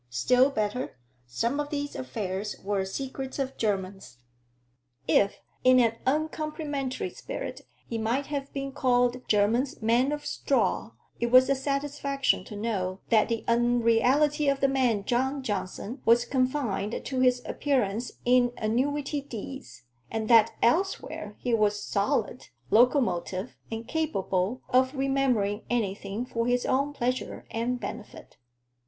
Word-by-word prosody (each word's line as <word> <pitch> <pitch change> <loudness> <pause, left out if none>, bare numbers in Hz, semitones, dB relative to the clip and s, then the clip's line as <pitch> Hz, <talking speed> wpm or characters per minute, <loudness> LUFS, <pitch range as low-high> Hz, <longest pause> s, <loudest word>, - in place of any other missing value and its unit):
Still 250 - +3
better 215 - -2 0.3
some 235 - -1
of 290 0 -2
these 290 -1 -3
affairs 190 +10 -4
were 195 -1 0
secrets 265 +6 -5
of 270 -1 -2
Jermyn's. 195 - -3 0.9
If 200 +5 +3 0.3
in 255 0 +6
an 230 -2 +2
uncomplimentary 305 -2 -2
spirit - - -6 0.2
he 230 - -4
might 235 +6 0
have 280 -1 -4
been 275 -1 -4
called 245 -2 +2
Jermyn's 225 +6 +2
"man 235 +5 +2
of 295 0 -4
straw," - - 0 0.3
it 235 - +1
was 255 +2 +6
a - - +4
satisfaction 275 -2 -1
to 210 - -9
know 195 -4 -2
that 220 -1 +4
the 230 -1 -2
unreality 245 +5 +3
of 275 0 +1
the 275 - +3
man 250 -6 +1
John 265 +3 0
Johnson 210 +2 -4
was 235 +1 +4
confined 255 -6 -1
to 260 -2 -2
his 250 -1 +3
appearance 245 -5 -1
in 245 0 +4
annuity 280 +6 0
deeds, 250 - -8 0.3
and 220 -1 -3
that 230 -1 +6
elsewhere 240 - 0
he 245 - -2
was 210 -2 +2
solid, 205 +4 -1 0.2
locomotive, 230 - +2 0.2
and 225 +1 -5
capable 245 - -1
of 260 +2 +3
remembering 265 -7 +1
anything 205 -1 -2
for 230 -1 -2
his 245 0 +1
own 280 +2 +1
pleasure 255 -2 -3
and 240 +2 -1
benefit. 205 0 -8
245 Hz, 135 wpm, -27 LUFS, 215-275 Hz, 0.9 s, in